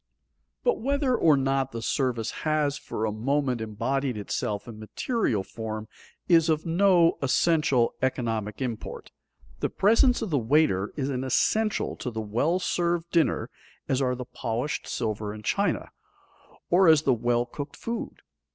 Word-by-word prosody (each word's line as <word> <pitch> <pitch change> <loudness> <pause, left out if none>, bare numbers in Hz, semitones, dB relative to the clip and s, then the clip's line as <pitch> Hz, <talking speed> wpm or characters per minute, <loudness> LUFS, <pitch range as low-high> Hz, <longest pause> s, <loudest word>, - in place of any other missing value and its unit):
But 485 - +2
whether 275 0 +1
or 155 -9 +4
not 135 -1 0
the 115 - -4
service 125 -3 -1
has 155 -2 +1
for 110 -6 -4
a 110 - -1
moment 130 +2 0
embodied 120 +4 -2
itself 105 +1 -3
in 110 -2 -9
material 110 - -1
form 110 +1 -6 0.4
is 165 -2 +5
of 155 -1 +1
no 175 0 +4
essential 140 -3 +2
economic 115 -3 -1
import. 120 -4 -6 0.5
The - - 0
presence 230 +4 +3
of 210 - -4
the 145 - +2
waiter 115 -6 +2
is 140 -1 -1
as 125 -1 -2
essential 215 - +1
to - - -4
the 110 -2 -5
well 120 - 0
served 175 -2 -1
dinner 165 -4 +1 0.4
as 135 0 +1
are 125 -1 +1
the 125 0 -6
polished 120 +4 -3
silver 105 -2 -3
and 105 0 -10
china, 200 - 0 0.8
or 185 +1 +5
as 160 -2 +6
the 135 - +3
well 120 +1 +1
cooked 140 +4 -7
food. 230 0 -5
135 Hz, 150 wpm, -26 LUFS, 115-165 Hz, 0.8 s, as